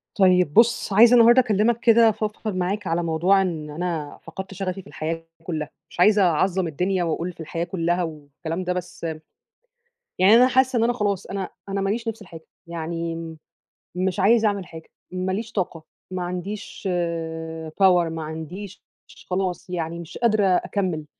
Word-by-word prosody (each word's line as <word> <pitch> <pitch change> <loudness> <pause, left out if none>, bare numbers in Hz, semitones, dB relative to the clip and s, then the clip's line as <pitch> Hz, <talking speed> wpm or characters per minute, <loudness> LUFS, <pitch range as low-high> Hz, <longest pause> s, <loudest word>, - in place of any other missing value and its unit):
طيب 180 -5 +4
بُص، 235 -3 +3
عايزة 230 +4 +7
النهارده 240 +2 +7
أكلّمك 225 0 +1
كده، 230 -1 +6
أفضفض 215 -1 -3
معاك 190 +2 -2
على 170 +1 0
موضوع 170 +4 +3
إن 160 -5 -3
أنا 160 -2 -4
فقدت 190 +4 -8
شغفي 195 0 -4
في - - -18
الحياة 165 +1 -4 0.2
كلّها، 155 -3 -4 0.2
مش - - -14
عايزة 205 +3 +5
أعظّم 180 +1 +2
الدنيا 180 +4 0
وأقول 170 +2 -2
في - - -32
الحياة 165 +1 -3
كلّها 175 0 -1
والكلام 160 +2 -6
ده، 180 0 -1
بس، 180 -1 -7 1.2
يعني 190 +3 +6
أنا 250 +2 +7
حاسّة 260 0 +2
إن - - +3
أنا 240 +1 +2
خلاص، 205 -5 -1
أنا 195 -2 -4 0.2
أنا 195 0 -1
ما 195 - 0
ليش 230 +3 -2
نِفْس 225 -1 -4
لحاجة، 165 -4 -12 0.2
يعني، 165 0 -4 0.8
مش 185 +2 -1
عايزة 220 +3 +4
أعمل 200 -2 -1
حاجة، 160 -1 -12 0.2
ما 185 +1 -2
ليش 220 +4 -3
طاقة، 175 -6 -3 0.3
ما 185 -1 -3
عنديش 185 +3 -5
آآ 160 -2 -3
power 180 -1 +3
ما 165 -1 -4
عنديش، 160 +5 -7 0.5
خلاص 185 0 -2
يعني 170 -1 -3
مش 170 -2 -9
قادرة 215 -3 +2
أكمل، 180 -3 0
180 Hz, 165 wpm, -23 LUFS, 165-205 Hz, 1.2 s, عايزة